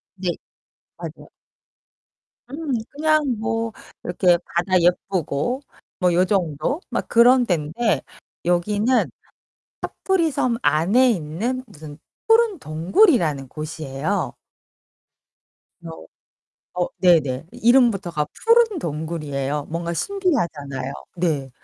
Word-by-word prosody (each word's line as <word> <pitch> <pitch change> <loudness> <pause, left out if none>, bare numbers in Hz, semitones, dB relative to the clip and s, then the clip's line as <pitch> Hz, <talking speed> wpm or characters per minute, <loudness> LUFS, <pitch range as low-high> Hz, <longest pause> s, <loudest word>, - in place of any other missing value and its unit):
네. 185 -1 -3 0.7
맞아요. - - -9 1.2
음, 295 -1 -3 0.2
그냥 310 +1 +2 0.2
뭐 225 +1 -1 0.3
이렇게 175 0 +3
바다 180 +2 +1
예쁘고 180 - 0 0.4
뭐 180 -1 +3
요정도 180 - 0
막 - - -3
그런 245 +2 +5
데인데 175 +4 0 0.4
여기는 205 +8 +2 0.8
카프리섬 320 -10 0
안에 185 - +4
있는 215 +8 -2
무슨 155 -7 -12 0.3
푸른 450 -4 +4
동굴이라는 165 - +2
곳이에요. 155 +4 -3 1.5
그래서 80 -1 -10 0.7
어 180 0 0
네네. 160 -6 +3
이 - - -12
이름부터가 215 - +3 0.2
푸른 460 -3 +4
동굴이에요. 150 - -3
뭔가 170 +1 -3
신기하잖아요. 165 - -2 0.2
네. 155 -6 -1
180 Hz, 215 characters per minute, -22 LUFS, 155-250 Hz, 1.5 s, 그런